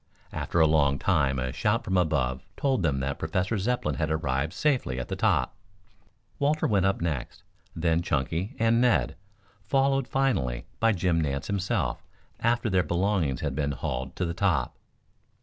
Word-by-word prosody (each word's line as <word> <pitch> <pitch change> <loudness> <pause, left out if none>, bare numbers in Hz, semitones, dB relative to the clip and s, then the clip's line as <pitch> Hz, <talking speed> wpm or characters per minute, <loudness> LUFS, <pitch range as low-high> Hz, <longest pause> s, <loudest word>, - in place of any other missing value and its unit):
After 85 - -1
a 80 - +7
long 70 -3 +3
time 70 -6 +1
a 65 0 -2
shout 115 +4 0
from 95 -4 -1
above 65 -8 +1 0.2
told 135 -6 +1
them 70 -6 0
that 70 +1 -3
Professor 90 +7 -1
Zepplin 95 - -1
had 75 - -1
arrived 75 -1 -1
safely 130 - 0
at 60 - -5
the - - -2
top. 65 - +1 0.8
Walter 150 +2 +1
went 95 -3 +3
up 95 - 0
next, 75 -8 -3 0.3
then 80 0 +1
Chunky 80 - -2
and 115 +1 +3
Ned, 115 -10 +2 0.5
followed 135 +5 +1
finally 115 - 0
by 115 0 +4
Jim 90 -4 +1
Nance 70 -2 -2
himself 95 -11 -1 0.4
after 120 0 +1
their 95 -3 +3
belongings 85 -4 0
had 75 -4 -2
been 70 0 -1
hauled 65 -1 -4
to 90 - -1
the 85 - -2
top. 85 -10 0
85 Hz, 165 wpm, -27 LUFS, 70-105 Hz, 0.8 s, a